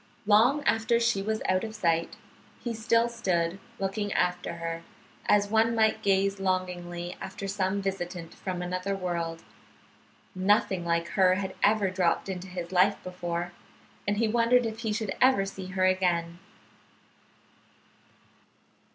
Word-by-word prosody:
Long 235 +8 +4
after 225 +1 +2
she 235 -4 +1
was 220 +2 -2
out 185 0 +2
of 220 -1 -5
sight 170 -5 0 0.4
he 235 - -3
still 230 +1 +2
stood 185 -6 -1 0.2
looking 200 +1 -2
after 180 -1 0
her, 165 0 -4 0.5
as 205 -1 +4
one 225 +1 +3
might 220 -1 +2
gaze 195 -1 +2
longingly 180 -2 -2
after 190 +1 -6
some 195 0 -1
visitant 175 -3 -4
from 180 -2 -4
another 185 +2 -2
world. 170 -3 -3 0.9
Nothing 190 -1 +2
like 170 0 0
her 185 +3 +4
had 190 0 -3
ever 205 -2 +3
dropped 185 0 +1
into 185 0 -5
his 180 -1 -6
life 190 +2 +4
before, 175 -1 -4 0.6
and 205 0 +1
he 225 +1 +2
wondered 235 +2 +3
if 220 0 -4
he 225 -2 -2
should 210 -2 -2
ever 255 -6 +5
see 195 -1 -7
her 185 0 0
again. 175 -2 +1
190 Hz, 140 wpm, -28 LUFS, 180-215 Hz, 0.9 s, ever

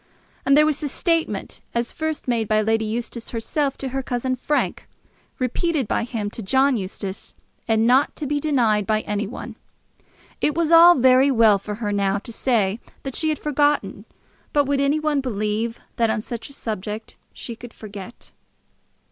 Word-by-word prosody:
And 275 +1 +6
there 300 - +6
was 305 -2 0
the 300 - -2
statement 320 - -1
as 235 0 -1
first 315 -2 -3
made 230 -3 0
by 215 0 +3
Lady 220 +1 +1
Eustace 230 +1 -4
herself 275 +4 -1
to 270 - -4
her 270 +1 -2
cousin 255 0 -2
Frank, 290 +4 -1 0.5
repeated 270 +2 0
by 225 - 0
him 220 -4 -4
to 230 - -7
John 265 +6 +3
Eustace, 190 -1 -6 0.3
and 225 0 +3
not 255 +4 +3
to 305 - -5
be 290 +1 0
denied 235 -9 +2
by 215 0 +2
any 210 0 -2
one. 225 - -8 0.8
It 300 - +1
was 335 -1 +1
all 340 +1 +9
very 260 +1 +5
well 225 -6 +5
for 210 +1 -5
her 210 -1 -3
now 200 -1 +1
to 210 - -8
say 220 -4 +1 0.2
that 270 -2 -5
she 315 - 0
had 305 - 0
forgotten; 295 0 0 0.5
but 290 -1 +3
would 280 0 +1
any 280 +2 +2
one 305 -2 +1
believe 220 -1 -2 0.2
that 230 -1 +2
on 220 0 0
such 235 +3 -6
a - - -11
subject 215 -2 -5 0.2
she 235 - -7
could 240 +1 -11
forget? 205 0 -10
240 Hz, 180 wpm, -22 LUFS, 215-280 Hz, 0.8 s, all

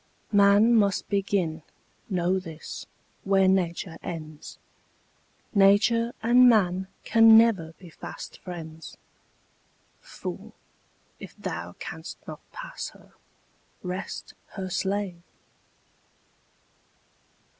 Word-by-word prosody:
Man 205 +3 +5
must 200 -4 +2
begin, 190 -5 0 0.5
know 185 0 +1
this, 165 -3 -9 0.4
where 195 -1 +3
Nature 175 -2 0
ends; 155 -3 -8 1.0
Nature 220 +4 +4
and 245 +2 +7
man 190 -4 +2 0.2
can 225 -1 +7
never 200 -8 +3
be 175 -3 -14
fast - - -9
friends. 165 -3 -9 1.0
Fool, - - -8 0.6
if - - -11
thou 85 +1 -5
canst 160 +1 -7
not - - -8
pass - - -6
her, - - -19 0.7
rest 185 +1 -5 0.2
her 190 -2 -5
slave! 195 -2 -2
190 Hz, 90 wpm, -26 LUFS, 170-205 Hz, 1.0 s, and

